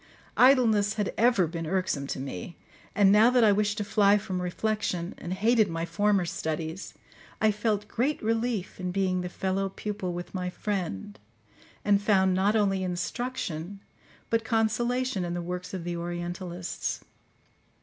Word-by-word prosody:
Idleness 225 -6 +5
had 210 -2 -1
ever 235 -5 +4
been 165 0 -5
irksome 180 -6 -1
to - - -4
me, 135 - -6 0.4
and 200 -2 +5
now 215 +3 +7
that 250 -1 +4
I 215 - +6
wished 205 +1 +1
to 210 - -1
fly 205 0 +4
from 195 -3 -3
reflection, 180 -1 -2
and 170 - -6
hated 215 +2 +3
my 165 0 -2
former 200 +2 +1
studies, 160 +2 -4 0.4
I 220 0 +4
felt 210 -1 -1
great 265 +7 0
relief 225 -4 -1
in 180 -1 -2
being 185 -1 0
the 180 - -4
fellow 190 +2 -1
pupil 200 -2 -4
with 175 0 -6
my 180 -1 -2
friend, 180 - -4 0.7
and 205 -1 +4
found 190 -3 +3
not 195 +4 +2
only 195 -3 +2
instruction 185 -1 -3 0.5
but 230 0 +2
consolation 230 0 0
in 175 0 -3
the - - -2
works 180 +1 -5
of 185 -3 -5
the 175 0 -3
orientalists. 175 +1 -4
195 Hz, 155 wpm, -28 LUFS, 175-215 Hz, 0.7 s, now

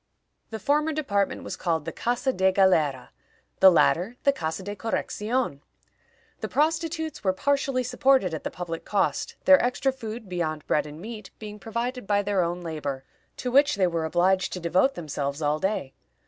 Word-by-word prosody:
The 225 - -5
former 300 +8 +1
department 205 -10 -1
was - - -5
called 160 -4 -1
the - - -3
Casa 245 +2 -1
de 190 -2 +3
Galera; 160 -9 +2 0.5
the 190 - +9
latter, 180 +5 +3
the 280 - +4
Casa 160 -4 -4
de 205 +2 -5
Correccion. 220 - -2 0.8
The - - -3
prostitutes 320 0 -1
were 190 -2 +2
partially 275 +2 0
supported 255 -6 +2
at 160 - -4
the - - -2
public 170 -2 -6
cost, 205 - -1
their 280 0 +7
extra 250 +2 +1
food, 225 -3 -7
beyond 160 -4 -3
bread 150 - +1
and 150 +1 -10
meat, 215 +1 -8
being 210 -1 -9
provided 235 +2 -4
by 205 -1 +2
their 200 -2 +1
own 175 +1 -2
labor, 150 -5 -4 0.3
to 250 - -3
which 280 +3 +5
they 195 -2 +2
were 170 -2 -1
obliged 185 +3 +2
to 180 - -4
devote 180 - +2
themselves 145 -3 -3
all 150 0 0
day. 190 -8 -2
195 Hz, 175 wpm, -26 LUFS, 170-250 Hz, 0.8 s, the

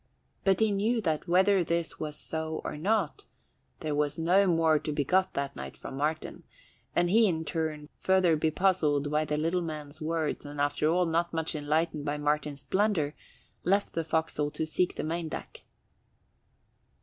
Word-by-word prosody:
But 195 0 +3
he 220 -1 +4
knew 215 +4 +1
that 160 -3 -1
whether 190 +2 +4
this 170 0 -2
was 150 -1 -4
so 160 0 -4
or - - -4
not, 190 +1 0 0.6
there 155 -1 -2
was 145 0 0
no 180 +4 +4
more 165 -3 +4
to 150 - -4
be 145 -1 0
got 185 +5 +2
that 140 0 -2
night 65 0 -7
from - - -8
Martin, 155 +3 -2 0.5
and 175 0 +3
he 225 +1 +6
in 160 -3 -1
turn, 155 -3 -3
further 185 -3 +4
bepuzzled 155 -2 +1
by 155 +1 +2
the 150 0 -1
little 165 +4 +1
man's 155 -2 -6
words 160 -1 -1
and 145 0 -8
after 145 +1 +1
all 180 +2 +3
not 170 +1 0
much 160 -1 -1
enlightened 155 +1 0
by 145 0 -2
Martin's 150 -1 -1
blunder, 165 -1 +1 0.5
left 200 +3 +1
the 165 - -1
forecastle 160 -2 0
to 150 +1 -3
seek 175 +3 0
the - - -3
main 165 +1 -2
deck. - - -8
160 Hz, 175 wpm, -29 LUFS, 150-180 Hz, 0.6 s, he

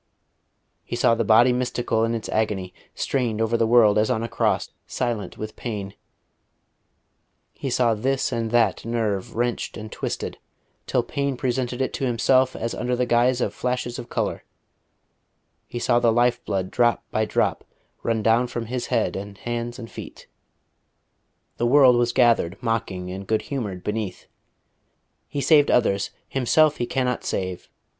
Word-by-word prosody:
He - - -5
saw - - +3
the 115 0 +1
Body 115 +4 +5
Mystical 120 -2 0
in 115 +1 0
its 115 - -5
agony, 100 -4 -1 0.2
strained 120 -5 -1
over 115 +1 +1
the 115 -1 +2
world 110 -3 +5
as 110 - +2
on 115 -3 0
a - - -2
cross, - - 0 0.2
silent 120 -5 -3
with 110 0 -6
pain; 100 -5 -5 1.6
he 135 - -5
saw 120 -2 +2
this 130 +5 0
and 115 -2 -1
that 115 -4 +2
nerve 110 -4 -2
wrenched 120 +1 -2
and 110 -1 -8
twisted, - - -4 0.5
till - - +1
pain 140 -2 -2
presented 125 0 -1
it - - -3
to 135 - -2
himself 130 +2 +3
as 115 +1 -3
under 125 0 -1
the 125 +1 +1
guise 120 +1 +2
of - - -1
flashes 125 -1 -2
of 120 - -8
colour; - - -2 1.2
he - - -6
saw 120 0 +2
the 115 -1 +3
life 120 +1 +2
blood 95 -1 -2
drop 120 -1 +2
by 110 - +1
drop 110 - 0 0.4
run 110 -2 -1
down 115 +3 +3
from 120 -1 -4
His 125 +2 -3
head 115 -3 0
and 100 0 -6
hands 120 +2 -4
and 115 -3 -8
feet. - - -10 1.3
The 120 - +1
world 130 -1 +6
was 120 0 +2
gathered 115 -7 +3
mocking 110 -6 -2
and 95 +1 -7
good 110 -1 +1
humoured 100 -9 -4
beneath. 105 -3 -4 1.1
"_He 140 - -2
saved 150 -3 +5
others: 100 -5 +2 0.2
Himself 145 +4 +3
He 120 - -2
cannot 125 -2 -1
save.... 95 -1 -3
120 Hz, 160 wpm, -24 LUFS, 110-125 Hz, 1.6 s, world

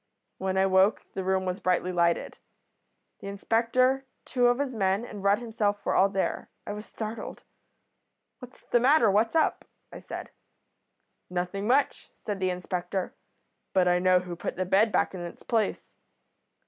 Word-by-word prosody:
"When 190 0 -1
I 190 - +4
woke 190 +2 +3
the 190 - -3
room 190 0 0
was 185 +1 -2
brightly 185 0 0
lighted. 170 -1 0 0.8
The - - -8
inspector, 235 +6 +1 0.2
two 245 -1 +2
of 245 0 +3
his 275 -2 -2
men, 195 +1 0
and 205 -4 -9
Rudd 200 +1 +4
himself 215 -3 -2
were - - +1
all 195 - +4
there. 195 -1 -2 0.2
I 205 - -4
was 210 +1 -8
startled. 220 +1 -6 1.0
"'What's 250 -1 -13
the 240 - +2
matter? 250 -3 +5
What's 220 +7 +2
up?' 320 - +2 0.3
I - - -8
said. - - -8 1.0
"'Nothing 180 +3 -3
much,' 270 +4 +1
said 205 -2 -5
the 185 -1 +1
inspector, 180 +1 -3 0.6
'but 185 -1 +3
I 180 0 +3
know 185 0 +4
who 180 -1 -6
put - - -4
the 185 - -1
bed 200 +4 +3
back - - +1
in 185 - -6
its 175 0 -8
place.' 225 -4 -1
195 Hz, 165 wpm, -27 LUFS, 185-230 Hz, 1.0 s, matter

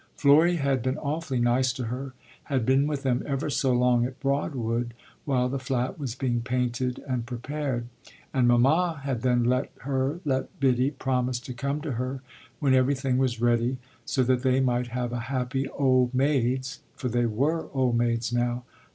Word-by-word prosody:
Florry 155 +5 +5
had 140 -5 +1
been 130 +4 -1
awfully 150 -3 -2
nice 125 +2 +2
to 130 0 -5
her 130 +3 -5 0.3
had 130 -6 0
been 135 +3 +3
with 145 -2 -3
them 125 -2 +1
ever 140 +1 -1
so 130 0 +1
long 125 -1 +3
at 130 +1 -4
Broadwood 120 -4 -1 0.3
while 130 -4 +1
the 135 +2 -2
flat 130 +5 -2
was 130 -5 -4
being 125 -3 -1
painted 125 +1 -1
and 125 -3 -2
prepared 130 0 -3 0.5
and 125 -2 +3
mamma 145 +7 +3
had 135 -5 -2
then 125 -2 +2
let 125 +3 +1
her, 135 +3 -1
let 135 -2 -2
Biddy, 130 -1 +3
promise 130 -3 -1
to 130 -2 -7
come 140 +5 -2
to 155 -2 -4
her, 130 +2 -3 0.4
when 135 -2 +3
everything 130 0 +2
was 125 -3 0
ready, 120 +2 +2 0.3
so 130 - +1
that 125 0 +2
they 130 0 +2
might 125 -2 +1
have 120 0 -3
a 120 - -2
happy 130 0 -1
old 130 -2 +2
maids' 130 0 +1 0.2
(for 130 - -4
they 120 0 +1
were, 145 +9 0
old 130 -3 +1
maids 120 0 0
now!) 120 0 0
130 Hz, 175 wpm, -26 LUFS, 120-140 Hz, 0.5 s, Florry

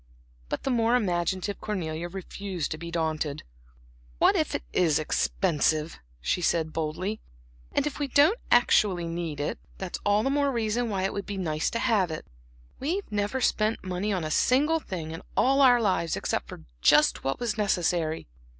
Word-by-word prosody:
But - - -3
the 270 - 0
more 235 0 +3
imaginative 185 -2 -1
Cornelia 170 -5 -3
refused 190 -2 -5
to 155 - -4
be 170 +1 -6
daunted. 155 -3 -2 0.7
"What - - +4
if - - 0
it - - -3
is 160 -5 +3
expensive!" 155 -1 0 0.2
she 65 - -1
said 160 -2 +1
boldly 165 +7 -2 0.5
"and - - +1
if 295 -1 -3
we 290 - 0
don't 295 - +4
actually 205 -7 +4
need 165 -3 -4
it, 145 - -2 0.2
that's 190 -2 -5
all 205 +1 +3
the 270 - +1
more 285 0 +2
reason 230 0 0
why 195 -3 -1
it 195 - 0
would 200 - -5
be 200 - -4
nice 155 -4 -1
to - - -2
have 215 -7 +2
it. 155 - -5 0.5
We've 345 - -2
never 205 +5 -1
spent 215 -2 +1
money 185 +3 -2
on 185 -4 -1
a 155 - -3
single 295 - +3
thing 170 - -6
in 165 - -7 0.2
all 275 +2 +4
our 250 -3 +7
lives 185 -6 +1
except - - -2
for - - -10 0.2
just 60 - +4
what 135 0 -1
was 235 -3 -1
necessary. 175 -6 0
190 Hz, 175 wpm, -27 LUFS, 165-230 Hz, 0.7 s, our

